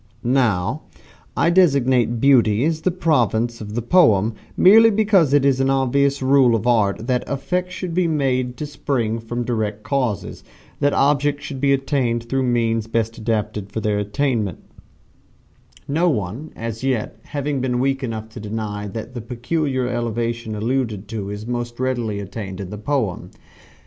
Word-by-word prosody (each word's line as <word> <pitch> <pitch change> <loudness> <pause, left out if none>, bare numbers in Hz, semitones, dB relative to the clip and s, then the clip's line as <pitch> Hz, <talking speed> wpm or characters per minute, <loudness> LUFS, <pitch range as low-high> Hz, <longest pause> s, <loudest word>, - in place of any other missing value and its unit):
Now 120 -1 +1 0.6
I 170 - +3
designate 130 -9 +3
Beauty 120 -3 +4
as 160 0 0
the 185 - +1
province 120 - 0
of 105 0 -7
the 120 - -2
poem, 115 - +4 0.2
merely 225 +4 +7
because 200 -8 +3
it 145 -1 +4
is 135 -2 +3
an 135 0 +2
obvious 135 +1 +1
rule 130 -3 +4
of 115 - -2
Art 110 -3 +2
that 125 -1 0
effects 180 +6 -2
should 180 -3 -4
be 180 0 +2
made 130 -5 0
to 150 - -4
spring 130 -6 -2
from 120 +2 -4
direct 110 -3 -2
causes 125 -8 -2 0.4
that 145 - +2
objects 145 +1 +2
should 135 -3 -6
be 140 -1 +3
attained 135 -4 0
through 135 +2 0
means 115 -3 0
best 115 0 -2
adapted 105 -2 -2
for 110 - -3
their 105 -1 0
attainment 105 - -1 1.3
no 165 +5 +2
one 115 - -3
as 115 +1 -5
yet 120 -4 -2
having 145 -2 -2
been 125 -1 0
weak 135 +1 0
enough 110 -3 -4
to 110 - -10
deny 105 -1 -4
that 110 +4 -7
the 120 - -5
peculiar 130 +3 -2
elevation 115 -2 -2
alluded 110 -2 -2
to 105 -3 -4
is 105 +1 -6
most 120 0 -4
readily 120 -5 -1
attained 95 -1 -6
in 95 -1 -6
the 105 - -6
poem. 110 -6 -2
120 Hz, 160 wpm, -21 LUFS, 110-140 Hz, 1.3 s, merely